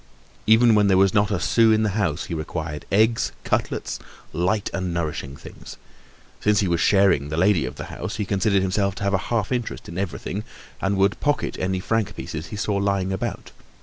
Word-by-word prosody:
Even 110 +1 +6
when 105 -1 +4
there 95 -1 +4
was 95 -1 +4
not 105 0 +3
a 100 -4 0
sou 115 +3 +4
in 110 0 +3
the 105 - +2
house, 90 -6 -1
he 85 - -6
required 80 -1 -5
eggs, 110 +3 +2
cutlets, - - -2 0.3
light 95 +5 0
and 95 -2 -2
nourishing 75 -5 -3
things. - - -11 0.6
Since 105 0 +2
he 100 - +1
was 85 -1 +1
sharing 95 -8 +3
the 80 - -3
lady 90 -4 +3
of 65 - -6
the - - -6
house, - - -5
he 105 - -2
considered 100 0 +1
himself 100 0 0
to - - -6
have 100 0 +1
a 95 - +3
half 115 -3 0
interest 120 -2 -3
in 85 +2 -5
everything 100 +2 -4 0.4
and 95 0 0
would 100 +1 +2
pocket 145 0 0
any 95 0 -1
franc 105 +1 -1
pieces 80 +1 -6
he 105 - -7
saw 100 0 -1
lying 100 -1 0
about. 95 - -4
100 Hz, 205 wpm, -23 LUFS, 90-105 Hz, 0.6 s, Even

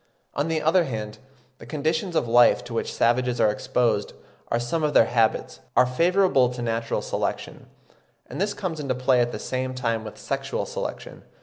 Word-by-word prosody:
On 145 +3 -1
the 160 -1 -1
other 170 +3 +4
hand, 110 -5 -5 0.4
the - - -12
conditions 160 +4 -1
of 125 - +1
life 120 +1 +5
to 120 - -9
which 115 - -2
savages 125 +1 +1
are 105 - +4
exposed, 120 -2 0 0.4
and 115 - +2
some 120 +7 -2
of 150 -1 0
their - - +7
habits, 115 -1 0 0.2
are - - +7
favourable 165 0 +3
to 125 0 -6
natural 115 0 -2
selection; - - -4 0.6
and - - -6
this 205 +1 0
comes 170 -5 -4
into 135 -3 -2
play 130 0 +3
at 120 0 0
the - - -5
same 130 0 -3
time 115 -3 -1
with 105 - -9
sexual - - -3
selection. - - -6
125 Hz, 185 wpm, -24 LUFS, 115-155 Hz, 0.6 s, their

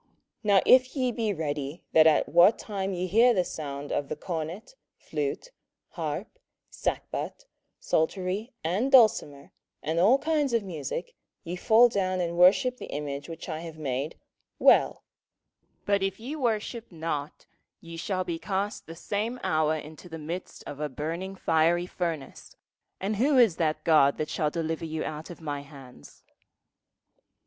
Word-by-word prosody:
27:003:015 - - -41 0.4
Now 200 -2 +5
if 255 +1 +5
ye 255 -3 +1
be 225 -3 -1
ready 150 -3 -4
that 160 0 +7
at 155 - +4
what 175 +6 +6
time 195 -2 -4
ye 180 -1 -2
hear 230 +6 +4
the 180 - +3
sound 145 -3 -6
of 145 - -2
the - - -2
cornet, 170 - -5 0.2
flute, 435 +3 -4 0.4
harp, - - -5 0.3
sackbut, - - -4 0.3
psaltery, 185 +7 -1
and 195 +12 0
dulcimer, 215 - +4 0.3
and 160 +2 0
all 215 +9 +6
kinds 295 -3 0
of 230 -2 +2
musick, 165 -2 -5 0.3
ye 170 +2 -5
fall 225 +5 +6
down 185 -4 -1
and 170 -1 -1
worship 195 +8 +5
the - - -8
image 145 +1 -5
which 165 - -8
I 160 -3 -4
have 165 -1 -8
made; 140 0 -3 0.4
well: - - +4 0.8
but 200 -1 +2
if 195 +1 -2
ye 260 +7 -5
worship 235 -4 -2
not, 155 -3 -4 0.3
ye 165 0 -10
shall 185 +3 -2
be 170 -2 -4
cast 200 +3 -3
the 165 - -8
same 210 +8 -3
hour 155 0 +2
into 155 +3 -9
the 165 - -6
midst 165 +4 -6
of 145 - -8
a 150 -1 -2
burning 165 +8 -4
fiery 170 0 +2
furnace; 165 -6 -5 0.4
and 200 +2 -2
who 270 +5 +3
is 225 -9 +5
that 155 -2 0
God 150 -4 +4
that 155 - -3
shall 150 - 0
deliver 165 0 -3
you 160 0 -3
out 155 +1 -6
of 175 - -10
my 145 -2 -4
hands? 135 - -14
175 Hz, 160 wpm, -27 LUFS, 155-210 Hz, 0.8 s, that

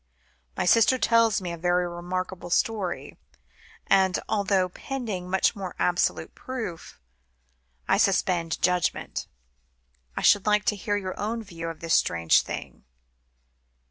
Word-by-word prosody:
"My - - 0
sister 230 +7 +5
tells 230 -4 +3
me 180 -2 -4
a 170 - -5
very 175 +1 +1
remarkable 180 +1 -5
story; 195 -1 -1 0.7
and 190 -1 +3
although, 195 -3 +1
pending 205 -3 -5
much 190 +4 +2
more 190 -3 -6
absolute 175 0 0
proof, 225 - -7 0.9
I - - +3
suspend 170 -3 +1
judgment, 180 -2 0 0.9
I - - -2
should 205 0 +4
like 210 0 +3
to 220 - +2
hear 205 +1 -2
your 185 -2 -5
own 225 +2 -2
view 165 -5 -6
of 165 - -9
this 165 -1 -1
strange 85 -1 +3
thing." - - -7
185 Hz, 130 wpm, -26 LUFS, 175-210 Hz, 0.9 s, sister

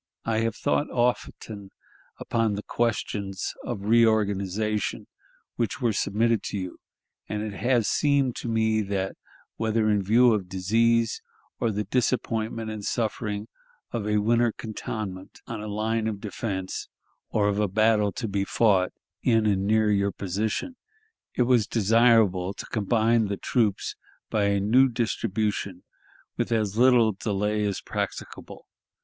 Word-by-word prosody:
I 110 -1 +1
have 115 0 0
thought 145 +2 0
often 115 -4 -2 0.5
upon 115 -3 0
the 105 - -5
questions 100 -4 -2
of 105 -5 -5
reorganization 105 -2 +1 0.5
which 115 -5 -1
were 120 -4 +1
submitted 110 +3 +1
to - - -3
you, 90 -2 -6 0.5
and 105 0 -2
it 110 -1 -4
has 120 +1 +1
seemed 140 -3 +2
to - - -5
me 110 -1 +2
that, 95 -1 -2 0.4
whether 110 -1 +1
in 105 -1 +2
view 115 +5 +5
of 95 -4 -2
disease, 115 +5 +1 0.4
or 115 - +1
the 105 0 -1
disappointment 115 -1 -1
and 105 -1 -6
suffering 105 -2 -2 0.4
of 110 -3 -3
a 105 0 +2
winter 115 +2 +3
cantonment 105 -3 -6
on 115 -2 -6
a 105 - -6
line 110 +2 -1
of 105 -2 -3
defense, 100 -2 -4 0.4
or 105 -1 +1
of 100 0 0
a 105 - +2
battle 105 +1 +3
to 115 - -3
be 100 -1 -1
fought 100 -3 +2 0.3
in 115 -3 +3
and 100 -2 +1
near 110 0 +3
your 100 -1 +2
position, 105 - -3 0.6
it 125 - +3
was 120 -4 +3
desirable 110 -4 +3
to - - -7
combine 110 +1 +2
the 100 0 -3
troops, 110 -3 0 0.4
by 105 -2 +2
a 100 0 +2
new 125 +7 +4
distribution, 110 -5 -2 0.5
with - - -1
as 105 -3 0
little 120 -2 +5
delay 105 +1 -1
as 100 -2 -1
practicable. - - -6
110 Hz, 145 wpm, -26 LUFS, 100-115 Hz, 0.6 s, view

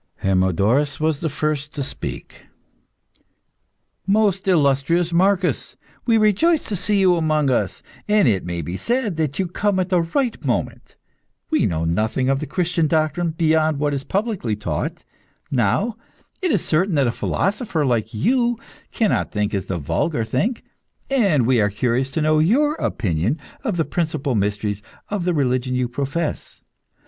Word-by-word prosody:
Hermodorus 100 - +2
was 155 -2 0
the 160 - -1
first 150 +1 -2
to 140 - -2
speak. - - -7 1.6
"Most 200 -2 +2
illustrious 165 +1 +2
Marcus, 185 +1 +1 0.3
we 230 -1 +4
rejoice 220 - +3
to 210 - -1
see 200 +3 +1
you 185 -2 +4
amongst 155 -4 +1
us, 105 -5 -1 0.2
and 210 -6 +4
it 100 -5 +2
may 85 -1 -4
be 85 +5 -4
said 235 - -1
that 155 -3 -1
you 190 - +1
come 190 +2 0
at 185 0 -1
the 180 -2 +3
right 235 +9 -1
moment. - - -3 0.6
We 315 - +3
know 80 -2 -1
nothing 110 +10 0
of 135 0 +2
the 155 - -5
Christian 170 +1 0
doctrine, 155 +2 +1
beyond 160 -2 +2
what 145 0 0
is 140 -1 -3
publicly 195 - -1
taught. 85 -8 -4 0.5
Now, 130 - +1 0.4
it 365 - +1
is 195 - 0
certain 175 +3 +1
that 140 -2 +3
a 120 - +1
philosopher, 195 - -1
like 115 -4 0
you, 240 - +1 0.3
cannot 220 -4 0
think 105 -1 -1
as 95 -3 -2
the 95 - -2
vulgar 85 - -1
think, 210 - -1 0.5
and 195 - +3
we 125 -2 +3
are 105 - +2
curious 125 +5 0
to 160 - 0
know 155 0 +3
your 265 - +3
opinion 105 - -1 0.2
of 220 -9 -1
the 160 - +1
principal 155 -5 -1
mysteries 105 -1 -1 0.3
of 205 -4 -2
the 180 - +1
religion 130 -2 0
you 125 -1 0
profess. 140 +6 -3
155 Hz, 160 wpm, -21 LUFS, 120-190 Hz, 1.6 s, we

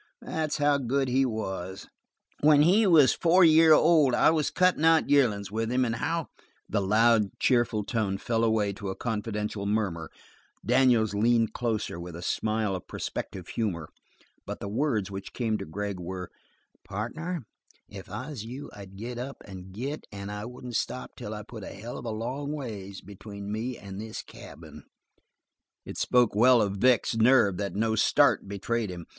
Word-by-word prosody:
That's 155 -2 -2
how 145 -1 +2
good 135 +1 0
he 130 +1 +2
was! 95 -5 -5 0.5
When 150 0 +5
he 200 +6 +4
was 155 -7 +6
a - - -9
four 175 +2 +5
year 160 0 +6
old 155 -5 +5
I - - +5
was 155 -2 +1
cutting 180 -3 +2
out 165 -2 +4
yearlin's 105 -9 +2
with 115 +2 -2
him, 125 0 +2
and 115 -1 -2
how 165 +5 -2 0.2
" - - -39
The 100 - 0
loud, 110 +1 +3
cheerful 120 -4 +2
tone 100 -3 -1
fell 115 +3 -1
away 110 -3 +1
to 100 0 -6
a 95 - -4
confidential 105 -2 -3
murmur, 100 -7 -1 0.6
Daniels 125 -4 +3
leaned 115 +1 +2
closer, 110 -7 -2
with 85 -1 -8
a 85 - -8
smile 110 0 -1
of 90 - -8
prospective - - -6
humor, 90 -9 -3 0.5
but - - -6
the - - -5
words 110 -3 -1
which 95 0 -7
came 110 -3 -1
to - - -5
Gregg 100 +3 -4
were: 90 +1 -6 0.5
"Partner, 155 - -5 0.4
if 95 -3 -11
I 125 +10 -6
was 125 -8 -6
you 125 +5 -8
I'd 100 -2 -11
get 120 +3 -6
up 135 +3 -7
and 95 -2 -10
git 135 +10 -5
and 100 0 -7
I 105 +1 -5
wouldn't 125 -1 -5
stop 125 - -4
till 105 +1 -6
I 105 - -7
put 110 -1 -10
a - - -8
hell 115 +5 -7
of - - -10
a - - -3
long 125 +6 -4
ways 105 -9 -7
between 100 +1 -9
me 115 +4 -3
and 100 0 -8
this 110 0 -6
cabin!" - - -12 1.0
It - - -7
spoke 125 -2 +3
well 120 +4 +5
of 100 -2 0
Vic's 120 +1 +3
nerve 115 -5 +4
that 100 -3 -3
no 110 +2 +1
start 105 - +3
betrayed 105 +2 -2
him. 90 -2 -7
110 Hz, 180 wpm, -27 LUFS, 100-130 Hz, 1.0 s, was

